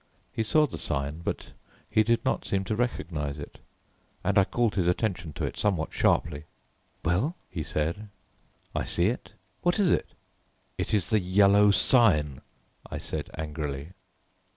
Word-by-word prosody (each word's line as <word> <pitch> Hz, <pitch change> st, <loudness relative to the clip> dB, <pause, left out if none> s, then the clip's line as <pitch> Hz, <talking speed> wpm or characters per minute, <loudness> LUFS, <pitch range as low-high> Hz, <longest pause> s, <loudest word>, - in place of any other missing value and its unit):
He -, -, -1 dB
saw 110 Hz, +8 st, +4 dB
the -, -, -7 dB
sign, 75 Hz, +1 st, -2 dB
but 85 Hz, -, -4 dB, 0.4 s
he 110 Hz, -, +5 dB
did 115 Hz, +3 st, +1 dB
not 130 Hz, -, +1 dB
seem 95 Hz, -1 st, -1 dB
to 100 Hz, +3 st, -2 dB
recognize 80 Hz, -, -2 dB
it, 70 Hz, -, -9 dB, 0.6 s
and 100 Hz, +1 st, +1 dB
I 100 Hz, -2 st, +6 dB
called 120 Hz, 0 st, +1 dB
his 90 Hz, -4 st, +1 dB
attention 90 Hz, -3 st, 0 dB
to -, -, -2 dB
it -, -, -5 dB
somewhat 90 Hz, -6 st, 0 dB
sharply. 70 Hz, +2 st, +1 dB, 0.6 s
"Well," 100 Hz, -, +1 dB, 0.2 s
he 80 Hz, -, -3 dB
said, 80 Hz, +7 st, -2 dB, 0.6 s
"I -, -, -1 dB
see 85 Hz, +3 st, +2 dB
it. 120 Hz, -, -5 dB, 0.3 s
What 175 Hz, +2 st, +2 dB
is 200 Hz, -5 st, +3 dB
it?" -, -, 0 dB, 0.6 s
"It -, -, 0 dB
is 100 Hz, -5 st, 0 dB
the 110 Hz, -, +4 dB
Yellow 100 Hz, +2 st, +5 dB
Sign," 90 Hz, -, +4 dB, 0.5 s
I -, -, -4 dB
said -, -, -5 dB
angrily. 75 Hz, -2 st, -4 dB
95 Hz, 155 wpm, -28 LUFS, 80-110 Hz, 0.6 s, I